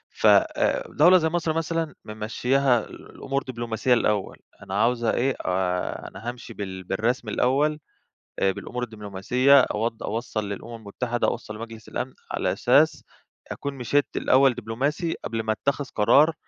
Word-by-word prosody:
ف - - +2
آآ - - +3
دولة 175 +5 +6
زي 160 -2 +1
مصر 165 -1 -1
مثلًا، 165 -1 -2
ممشّياها 120 +4 +1
الأمور 135 0 -5
دبلوماسية 120 0 -1
الأول، 105 -4 0 0.3
أنا 100 +2 -1
عاوزة 120 -1 +2
إيه، 130 +2 +1
آآ 90 -1 -1
أنا 110 +5 -7
هامشي 120 -1 -8
بال 95 -3 -6
بالرسمي 110 +4 -1
الأول، 145 +6 +1 0.6
آآ 95 - +3
بالأمور 125 +5 -5
الدبلوماسية 110 +5 +3
أوض 115 0 -2
أوصّل 110 -2 -3
للأمم 115 +4 -6
المتحدة، 115 +3 -2
أوصّل 110 -2 -4
لمجلس 115 0 -9
الأمن، 130 +1 -4 0.2
على - - 0
أساس - - +3 0.5
أكوّن 140 0 -4
مشيت 135 +3 +1
الأول 130 0 +4
دبلوماسي، 130 - -2
قبل 115 -1 -3
ما 110 - 0
اتخذ 140 +6 -1
قرار 140 +10 +5
120 Hz, 140 wpm, -25 LUFS, 110-140 Hz, 0.6 s, دولة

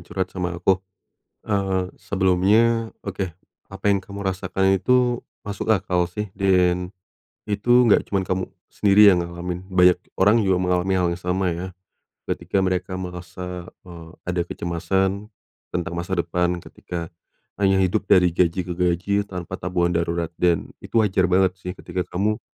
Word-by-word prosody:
curhat 95 +1 -4
sama 90 -2 -3
aku. 95 +2 +2 0.7
Eee, 95 -3 -1
sebelumnya, 100 +5 +2 0.2
oke, 95 -1 -3 0.4
apa 95 +1 -10
yang 100 - 0
kamu 100 +1 -8
rasakan 95 0 +1
itu 120 +5 +2 0.2
masuk 100 +1 -4
akal 90 -4 +2
sih. 105 +1 -5
Dan 90 -2 +2 0.6
itu 120 +4 +3
gak 110 - +5
cuma 95 -2 0
kamu 95 +1 -2 0.2
sendiri 100 0 +6
yang 90 - +1
ngalamin. 85 +1 -5
Banyak 90 -2 +4 0.2
orang 105 +4 +4
juga 95 -3 +2
mengalami 90 +1 +1
hal 90 -1 +2
yang 90 - -9
sama 90 +1 -1
ya. 90 +3 -5 0.6
Ketika 95 -1 -1
mereka 95 0 -1
merasa, 90 0 -7 0.2
eee, 85 -2 -11
ada 90 -1 -1
kecemasan 95 +4 -1 0.4
tentang 85 -1 -3
masa 85 +2 -3
depan, 90 0 0
ketika 85 -1 -7 0.5
hanya 95 -1 +4
hidup 100 +2 -1
dari 90 -3 +5
gaji 90 +1 +1
ke 90 - -4
gaji 90 +4 0
tanpa 90 -2 -6
tabungan 90 -1 0
darurat. 85 0 -1
Dan 85 -2 +1
itu 115 -2 +1
wajar 95 -2 +2
banget 95 0 +3
sih 90 0 -6
ketika 90 +1 -5
kamu 105 +5 -1
95 Hz, 150 wpm, -23 LUFS, 90-100 Hz, 0.7 s, sendiri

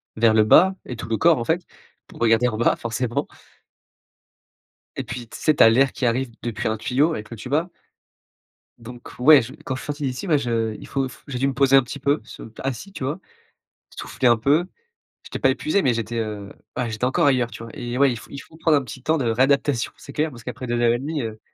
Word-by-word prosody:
vers 110 0 +4
le 110 -1 +4
bas 185 - +6
et 125 - -6
tout 115 0 -8
le 110 - 0
corps 165 +1 +4
en - - -2
fait 165 +7 -1 0.4
pour - - -14
regarder 115 +1 +4
en 110 - -2
bas, 120 - +3
forcément. 120 +1 -2 1.7
Et - - -2
puis 120 -2 -7
tu - - -9
sais, 155 - +2
tu - - +6
as 115 - +8
l'air 130 +4 +3
qui 130 - -2
arrive 125 +2 0
depuis 120 -3 -3
un 110 0 -1
tuyau 140 +9 +1
avec 110 -7 -6
le 115 - -8
tuba. 150 - -2 1.1
Donc 120 +1 -11
ouais, 145 +2 +7
je 120 +3 -8
quand 130 - -2
je 130 - -7
suis - - -10
sorti 145 0 -5
d'ici, 130 +7 -3
bah, 155 -4 +4
je 115 -4 -1
il - - -11
faut 135 -1 -1
f 130 - -14
j'ai 135 -3 -4
dû 135 - +2
me 135 - -1
poser 135 0 +4
un 135 - +6
petit 130 +3 -8
peu, 140 +3 +1
ce - - -11
p 115 - -11
assis, 135 - -4
tu 190 - -7
vois? 145 +7 -2 0.7
Souffler 130 - -2
un 120 -1 +5
peu, 145 +9 +2 0.6
j'étais - - -7
pas - - +3
épuisé 255 -10 0
mais 125 -3 +2
j'étais, 115 0 -4
heu, 105 -3 -4 0.2
ah, 125 - -2
j'étais 110 +2 -3
encore 130 +3 +2
ailleurs, 125 -4 +2
tu 115 - -9
vois? 115 - -9
Et 120 -3 -4
ouais, 140 -1 +5
il 120 - -3
faut - - -15
il 140 - -8
faut 160 - -13
prendre 160 -1 +3
un - - -3
petit 125 +1 -10
temps 160 +4 +1
de 130 - -1
réadaptation, 135 +1 +1
c'est 140 - -12
clair, 155 +1 0
parce 120 -4 -12
qu'après 125 +1 -6
2 120 0 -1
heures 120 -1 +4
et 120 - -1
1/2, 145 +1 -3
heu, 110 -1 -6
125 Hz, 250 wpm, -22 LUFS, 115-140 Hz, 1.7 s, as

